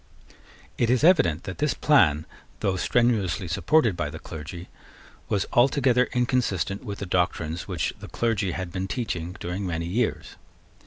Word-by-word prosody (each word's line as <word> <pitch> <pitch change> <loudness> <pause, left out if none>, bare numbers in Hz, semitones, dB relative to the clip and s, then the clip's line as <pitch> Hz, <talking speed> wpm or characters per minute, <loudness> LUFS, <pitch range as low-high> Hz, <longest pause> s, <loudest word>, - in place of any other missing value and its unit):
It 120 - +2
is 125 +1 +2
evident 145 - +4
that 95 -3 -7
this 150 -3 +1
plan, 80 - +4 0.4
though 95 - +1
strenuously 105 -3 +1
supported 115 - +2
by 85 -3 -2
the 80 - -7
clergy, 80 +2 -8 0.6
was 100 -2 +1
altogether 125 0 +3
inconsistent 120 - 0
with 100 -1 -5
the 100 - -5
doctrines 85 -2 -1
which 90 -5 -2
the - - -9
clergy 105 -6 -1
had 90 -1 -4
been 95 +1 -3
teaching 90 -6 -3
during 90 +3 -4
many 85 -3 -2
years. 110 +7 -2
95 Hz, 150 wpm, -25 LUFS, 85-120 Hz, 0.6 s, evident